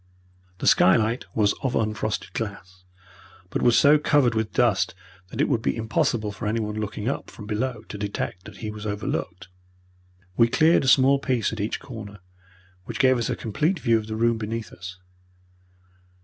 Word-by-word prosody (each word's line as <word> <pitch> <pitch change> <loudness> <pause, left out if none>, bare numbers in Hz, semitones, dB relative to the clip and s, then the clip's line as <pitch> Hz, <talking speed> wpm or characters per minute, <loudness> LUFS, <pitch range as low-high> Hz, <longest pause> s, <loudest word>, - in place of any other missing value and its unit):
The - - -5
skylight 110 +5 +4
was 105 -2 +3
of 130 -3 -1
unfrosted 110 -2 -2
glass, 95 -4 -6 0.7
but - - -2
was 120 -1 +4
so 150 +1 +6
covered 145 -5 +3
with 110 -1 -1
dust 110 -8 +2 0.3
that - - -9
it - - +3
would 120 -6 +1
be - - 0
impossible 110 -1 0
for 105 +2 -5
anyone 105 -1 -1
looking 105 0 -4
up 135 - -3
from 105 - -11
below 110 +2 -3
to 105 - -7
detect 100 -1 -4
that - - -11
he 105 - -3
was 105 0 -7
overlooked. 95 -3 -4 0.9
We 115 +2 +5
cleared 160 +7 +4
a - - -1
small 135 +1 +5
piece 125 -6 0
at 110 - -6
each 105 +2 -2
corner, 105 -4 -9 0.7
which 115 - -5
gave 130 -2 +4
us 115 - -1
a - - 0
complete 155 - -1
view 115 -6 +2
of 110 - -8
the 110 - -4
room 115 0 +1
beneath 110 +1 -5
us. 90 +1 -9
110 Hz, 175 wpm, -24 LUFS, 105-120 Hz, 0.9 s, so